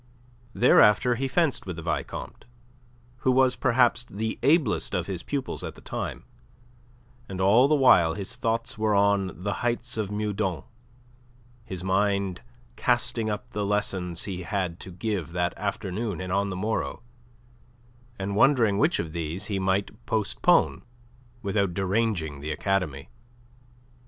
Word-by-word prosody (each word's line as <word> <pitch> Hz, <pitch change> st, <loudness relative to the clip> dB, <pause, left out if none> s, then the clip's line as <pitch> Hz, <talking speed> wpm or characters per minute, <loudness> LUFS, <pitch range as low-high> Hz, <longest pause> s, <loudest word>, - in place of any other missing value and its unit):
Thereafter 120 Hz, 0 st, +5 dB
he 135 Hz, +3 st, -1 dB
fenced 155 Hz, -, 0 dB
with 90 Hz, -, -4 dB
the 85 Hz, -, -8 dB
Vicomte, -, -, -4 dB, 0.7 s
who 130 Hz, +1 st, +1 dB
was 130 Hz, 0 st, +4 dB
perhaps 120 Hz, -1 st, +3 dB
the 110 Hz, 0 st, -4 dB
ablest 140 Hz, -4 st, +2 dB
of -, -, -1 dB
his 95 Hz, -3 st, -4 dB
pupils 140 Hz, -2 st, -3 dB
at -, -, -6 dB
the -, -, -14 dB
time, -, -, -5 dB, 1.1 s
and 95 Hz, -1 st, -5 dB
all 105 Hz, +8 st, +5 dB
the 155 Hz, -, +3 dB
while 90 Hz, -, +5 dB
his 100 Hz, +5 st, -5 dB
thoughts 115 Hz, -2 st, -2 dB
were 110 Hz, -1 st, +2 dB
on 100 Hz, -2 st, +1 dB
the 100 Hz, 0 st, -1 dB
heights 120 Hz, 0 st, -1 dB
of 105 Hz, -3 st, -1 dB
Meudon, 105 Hz, -5 st, -2 dB, 1.0 s
his 95 Hz, -6 st, -6 dB
mind 100 Hz, -1 st, 0 dB, 0.3 s
casting 120 Hz, -2 st, +1 dB
up 105 Hz, -1 st, -5 dB
the 105 Hz, -, -2 dB
lessons 95 Hz, -4 st, -1 dB
he 95 Hz, -3 st, -4 dB
had 90 Hz, -1 st, -3 dB
to -, -, -9 dB
give 90 Hz, -4 st, -3 dB
that 90 Hz, 0 st, -1 dB
afternoon 100 Hz, -1 st, -3 dB
and 95 Hz, 0 st, -4 dB
on 100 Hz, +1 st, +1 dB
the 95 Hz, -, -4 dB
morrow, 110 Hz, +4 st, -2 dB, 1.1 s
and 100 Hz, 0 st, -3 dB
wondering 115 Hz, -5 st, +4 dB
which 155 Hz, +4 st, +3 dB
of 80 Hz, -, -3 dB
these 85 Hz, +3 st, -3 dB
he 95 Hz, -, 0 dB
might 95 Hz, +4 st, -1 dB
postpone 110 Hz, -, +2 dB, 0.6 s
without 100 Hz, -3 st, 0 dB
deranging 95 Hz, -7 st, -1 dB
the 75 Hz, -, -5 dB
academy. 90 Hz, -6 st, -1 dB
100 Hz, 140 wpm, -26 LUFS, 95-115 Hz, 1.1 s, Thereafter